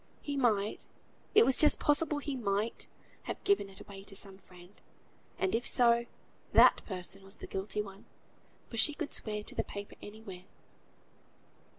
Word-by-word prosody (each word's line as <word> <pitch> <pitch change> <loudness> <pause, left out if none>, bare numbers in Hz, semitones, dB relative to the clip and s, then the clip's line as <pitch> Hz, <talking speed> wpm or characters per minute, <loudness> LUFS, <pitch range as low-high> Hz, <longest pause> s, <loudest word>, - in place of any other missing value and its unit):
He 285 - -3
might, 215 -6 0 0.5
it 435 - +8
was 265 - +4
just 305 - +7
possible 295 +1 +2
he 290 -1 -4
might, 215 -1 -2 0.4
have - - -5
given 400 - +2
it 195 +1 -9
away 200 -1 -11
to 200 - -9
some 195 -1 -1
friend; 180 -1 -16 0.7
and 190 - 0
if 230 +2 0
so, 235 -1 +3 0.5
that - - +6
person 190 0 -5
was 195 +2 -5
the - - -9
guilty 200 +2 -3
one, 195 0 -12 0.6
for 230 - -8
she 295 +6 +3
could 315 -2 -5
swear 210 -1 -1
to - - -9
the - - -1
paper 200 0 -8
anywhere. 205 -4 -10
210 Hz, 165 wpm, -32 LUFS, 195-250 Hz, 0.7 s, it